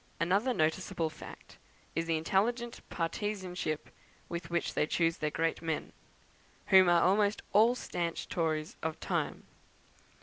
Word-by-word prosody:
Another 195 +10 +2
noticeable 165 -2 0
fact - - -12 0.3
is 165 +1 -1
the 165 -1 +2
intelligent 230 +8 0
partisanship 180 -3 -3 0.4
with 170 -1 -5
which 170 0 -1
they 150 - +1
choose 165 0 +1
their 150 - -1
great 165 +2 -1
men, 160 -2 -3 0.8
who 190 -2 +8
are 170 -1 +5
almost 205 +3 +3
all 225 +4 +6
stanch 170 -8 -3
Tories 155 -2 -1
of 160 -1 -3
the - - -8
time. - - -1
170 Hz, 135 wpm, -32 LUFS, 165-200 Hz, 0.8 s, who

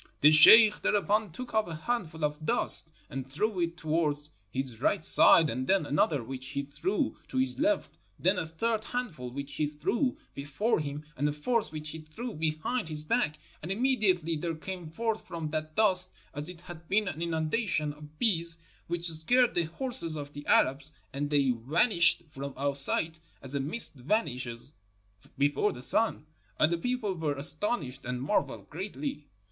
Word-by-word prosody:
"The 150 - +7
sheikh 210 +8 +8
thereupon 210 -1 0
took 250 +9 -9
up 220 -3 +1
a 165 - -6
handful 160 -4 -3
of 150 +1 -4
dust 155 +1 +4 0.2
and 135 -1 -7
threw 205 +7 -1
it 170 0 -2
towards 150 -2 -2 0.2
his 125 0 -4
right 155 - +1
side, 165 0 +6
and 130 -1 -4
then 190 -4 +2
another 145 -2 0
which 130 +2 -5
he 140 +1 -3
threw 170 - -3
to 260 - -6
his 260 0 +3
left, 310 0 -1 0.2
then 185 0 +1
a 160 - -4
third 220 +7 -2
handful 200 - -5
which 140 +2 -7
he 150 +2 -1
threw 165 - -2 0.2
before 145 - -1
him, 150 0 -6
and 145 +3 0
a - - -1
fourth 220 +10 -1
which 155 -1 -4
he 160 - -7
threw 210 +10 -8
behind 160 +7 -2
his 150 -1 -2
back. 155 -5 0 0.2
And 170 - -6
immediately 195 -8 +1
there 165 +2 -4
came 175 0 -7
forth 225 +6 -3
from 160 -3 -5
that 155 0 -4
dust 185 -4 +7 0.2
as 150 +2 -5
it 175 -2 -11
had 175 -2 -12
been 210 +1 +1
an 165 -4 -5
inundation 160 -1 -1
of 150 +1 -15
bees, 170 -6 0 0.3
which 170 0 -1
scared 235 +11 +4
the 170 - +1
horses 170 - +2
of 145 0 -8
the 145 0 -10
Arabs, 135 +3 +2 0.2
and 145 +1 -3
they 140 -3 +2
vanished 170 - +2
from 140 -1 -7
our 140 +1 -1
sight 160 +4 0 0.2
as 135 0 -5
a 140 - -1
mist 155 +12 0
vanishes 130 - -3 0.6
before 145 +8 +1
the 125 - -9
sun; 220 - +3 0.3
and 155 +7 +2
the - - 0
people 245 -1 -2
were 155 -5 -3
as 140 - +5
tonished 150 - -3
and 125 0 -4
marveled 205 - -2
greatly. 150 -4 -6
160 Hz, 180 wpm, -29 LUFS, 145-205 Hz, 0.6 s, sheikh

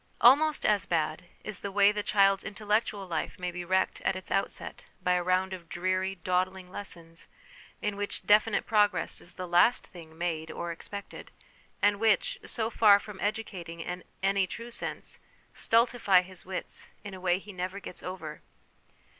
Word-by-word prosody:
Almost 290 +5 +6
as 210 -2 +3
bad 160 +1 0 0.2
is 215 -3 -3
the 200 - -4
way 200 +1 +5
the 210 0 -2
child's 195 -1 +3
intellectual 210 -1 -1
life 170 +1 -3
may 180 -1 -3
be 175 0 -5
wrecked 185 +2 +1
at - - +1
its 185 - -7
outset 195 - -2 0.2
by 180 - +2
a 180 - +2
round 185 +1 +1
of 170 -3 -9
dreary, 185 +2 -1
dawdling 185 +1 -1
lessons 170 -4 -6 0.6
in 210 -1 0
which 205 0 -3
definite 210 +1 +4
progress 205 -3 +2
is 175 - -6
the 185 -1 -5
last 175 +8 +4
thing 160 -2 -13
made 165 -2 -2
or 170 +2 -4
expected, 200 +4 -8 0.5
and 205 0 +4
which, 220 -2 +2
so 225 0 -2
far 210 -3 +7
from 205 -2 -10
educating 190 -6 -3
in 180 +2 -5 0.2
any 195 -1 +2
true 235 +5 -7
sense, 235 - -4 0.3
stultify 230 -5 +4
his 185 -1 -10
wits 190 - -5
in 200 - -7
a 185 - -9
way 180 -1 +2
he 200 +2 -10
never 185 +2 -4
gets 180 - -9
over. 160 -5 -7
190 Hz, 170 wpm, -29 LUFS, 180-205 Hz, 0.6 s, far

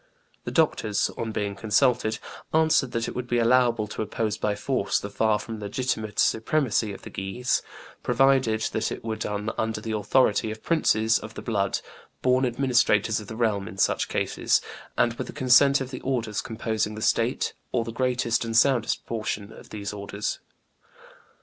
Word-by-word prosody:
The - - -3
doctors, 110 -10 +1
on 115 -1 -3
being 105 -2 -2
consulted, 110 +2 +2 0.4
answered 160 -5 +3
that 115 0 -1
it - - -5
would 125 -1 -4
be 120 - +1
allowable 120 -2 +3
to - - -4
oppose 110 0 -1
by 105 -1 -1
force 115 0 0
the 100 - -7
far 110 +1 +2
from 110 0 -7
legitimate 110 0 -3
supremacy 110 -2 +1
of 100 - -10
the - - -9
Guises, 95 +6 -1 0.4
provided 125 -3 +3
that - - -1
it - - -6
were 110 -1 -2
done 105 +1 -3
under 110 0 -1
the 110 +1 -5
authority 110 +1 +2
of 110 0 -7
princes 115 -9 +2
of - - -10
the - - -7
blood, 100 -4 0 0.4
born 130 0 +3
administrators 120 -4 +2
of 105 - -10
the 110 - -7
realm 105 -4 0
in 95 - -9
such - - +1
cases, - - +1 0.4
and 120 - +3
with - - -3
the - - -8
consent 135 +2 +5
of 135 0 -5
the 130 - -6
orders 115 -5 -1
composing 110 -2 -2
the 110 - -7
state, 115 +3 +1 0.2
or 115 -2 0
the 115 - -5
greatest 125 -1 0
and 115 -1 -1
soundest 120 -2 +3
portion 105 -2 -4
of - - -14
those 105 -1 -5
orders. 100 +1 -4
115 Hz, 175 wpm, -26 LUFS, 105-125 Hz, 0.4 s, consent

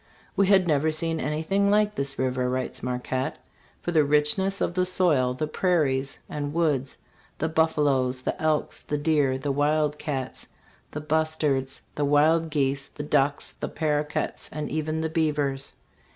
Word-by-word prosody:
" 225 - -30
We 195 - +3
had 190 -2 +5
never 155 0 +2
seen 160 +1 -1
anything 160 +8 0
like 210 0 +3
this 140 -3 -3
river," 130 -1 0
writes 130 0 -3
Marquette, 125 +1 -2 0.2
" - - -32
for 175 - -1
the 155 -3 +4
richness 150 +7 +2
of - - 0
the 185 0 +1
soil, 165 -9 +2
the 155 - -1
prairies 150 -6 0
and 145 0 -4
woods, 145 -6 0 0.4
the 160 - -1
buffaloes, 145 -5 +1
the - - -3
elks, 155 -1 0
the 150 - -3
deer, 145 -3 +2
the 140 +1 -2
wild 150 +1 +1
cats, 135 -4 -4 0.4
the 150 - -6
bustards, 150 -4 0
the 145 - -1
wild 155 +3 +3
geese, 140 -2 0
the 150 - -8
ducks, 145 0 +1
the - - -3
paroquets 150 -1 -2
and 150 -1 -4
even 155 +1 -1
the 160 - 0
beavers. 145 -4 -1
150 Hz, 165 wpm, -26 LUFS, 135-160 Hz, 0.4 s, had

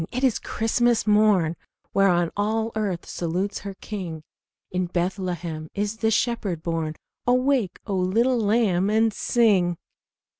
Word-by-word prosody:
'tis 255 -2 +1
Christmas 235 +1 +1
morn, 210 -6 +3 0.4
Whereon 175 -4 +3
all 220 +2 0
earth 200 -5 -2
salutes 180 +4 -2
her 200 -1 -7
King! 180 -7 -6 0.5
In 180 0 -1
Bethlehem 175 -3 -3
is 205 +2 -2
the 220 0 +1
Shepherd 210 -7 0
born. 165 -2 -2 0.3
Awake, 250 -5 +2
O 200 - -2
little 225 +7 +2
lamb, 205 -4 +2
and 220 0 +3
sing!" 195 -8 +2
200 Hz, 120 wpm, -24 LUFS, 175-225 Hz, 0.5 s, morn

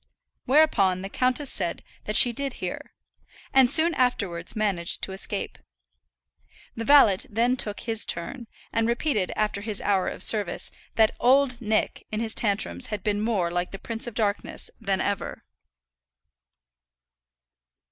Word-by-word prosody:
Whereupon 200 -11 +3
the 195 - -5
countess 255 +5 0
said 175 -4 -2 0.2
that 215 - -3
she 240 +1 +7
did 275 +1 -2
hear, 180 -5 -7 0.6
and 265 -2 +6
soon 325 +5 +3
afterwards 200 - -1
managed 195 -6 +1
to - - -3
escape. 190 - -3 1.2
The 230 - -4
valet 230 -8 +6
then 235 +4 +1
took 210 -5 -3
his 225 -1 0
turn; 235 +8 -3 0.3
and 225 0 +1
repeated, 235 -4 0
after 210 -1 -1
his 210 -1 -4
hour 195 -2 0
of - - -3
service, 205 -5 +1 0.2
that 220 -1 +3
"Old 255 0 +3
Nick" 215 -1 -1
in 215 - -2
his 225 -1 -2
tantrums 195 - 0
had 205 -3 -5
been 205 -1 0
more 205 -6 0
like 175 0 -2
the 195 - -8
Prince 230 +3 -3
of 235 - -7
Darkness 210 -3 -2
than 195 -1 -1
ever. 200 -1 -3
215 Hz, 145 wpm, -25 LUFS, 195-245 Hz, 1.2 s, she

